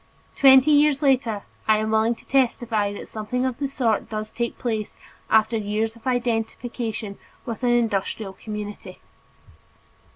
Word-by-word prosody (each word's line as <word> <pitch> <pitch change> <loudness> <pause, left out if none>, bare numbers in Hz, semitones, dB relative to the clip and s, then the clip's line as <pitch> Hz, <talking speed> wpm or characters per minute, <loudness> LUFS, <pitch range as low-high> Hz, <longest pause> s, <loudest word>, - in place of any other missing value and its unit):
Twenty 265 +2 +7
years 295 -1 +4
later 250 -7 +2 0.2
I 215 0 +5
am 215 0 -1
willing 220 +2 +2
to - - -20
testify 235 -5 +1
that 205 - -8
something 235 +4 -3
of 255 -1 -2
the 280 - -1
sort 240 -6 0
does 215 0 -4
take 235 0 -3
place 220 -4 -3 0.3
after 220 +1 +3
years 215 +2 -2
of 230 +3 -11
identification 230 -3 -2 0.3
with 230 -1 -5
an 245 - +1
industrial 220 -4 0
community. 210 +1 -7
225 Hz, 140 wpm, -23 LUFS, 215-250 Hz, 0.3 s, Twenty